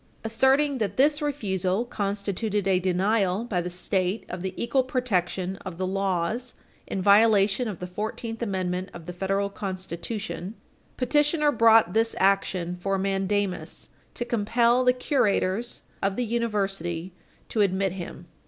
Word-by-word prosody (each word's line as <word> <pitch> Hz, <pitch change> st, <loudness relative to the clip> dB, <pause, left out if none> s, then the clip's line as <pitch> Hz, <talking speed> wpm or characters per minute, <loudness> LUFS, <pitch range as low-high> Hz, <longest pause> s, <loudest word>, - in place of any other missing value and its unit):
Asserting 265 Hz, +5 st, +2 dB
that 210 Hz, -3 st, -2 dB
this 290 Hz, +3 st, +4 dB
refusal 200 Hz, -7 st, -1 dB
constituted 205 Hz, -1 st, -2 dB
a 190 Hz, -1 st, +3 dB
denial 190 Hz, +2 st, +1 dB
by 200 Hz, -7 st, -1 dB
the 175 Hz, -, -4 dB
State 185 Hz, +3 st, -1 dB
of 180 Hz, -, -5 dB
the 190 Hz, 0 st, -3 dB
equal 260 Hz, +3 st, +1 dB
protection 190 Hz, -7 st, -1 dB
of 185 Hz, -4 st, -8 dB
the 185 Hz, -, -1 dB
laws 195 Hz, +5 st, -1 dB, 0.3 s
in 190 Hz, -, -3 dB
violation 210 Hz, +2 st, +5 dB
of 205 Hz, -5 st, -4 dB
the 180 Hz, -, -6 dB
Fourteenth 220 Hz, +5 st, -5 dB
Amendment 185 Hz, -3 st, -2 dB
of 170 Hz, -2 st, -9 dB
the 180 Hz, -, -6 dB
Federal 195 Hz, +2 st, 0 dB
Constitution, 190 Hz, +1 st, -5 dB, 0.4 s
petitioner 295 Hz, +3 st, +2 dB
brought 225 Hz, -6 st, +5 dB
this 225 Hz, +1 st, +2 dB
action 185 Hz, -2 st, +1 dB
for 195 Hz, +2 st, 0 dB
mandamus 195 Hz, 0 st, -2 dB, 0.3 s
to 240 Hz, -, -3 dB
compel 235 Hz, +2 st, +2 dB
the 250 Hz, -, +5 dB
curators 240 Hz, -4 st, 0 dB, 0.2 s
of 195 Hz, 0 st, 0 dB
the 245 Hz, -, -1 dB
University 195 Hz, -7 st, -2 dB, 0.4 s
to 220 Hz, -, +1 dB
admit 195 Hz, -1 st, +2 dB
him. 175 Hz, -1 st, -7 dB
200 Hz, 140 wpm, -26 LUFS, 185-230 Hz, 0.4 s, violation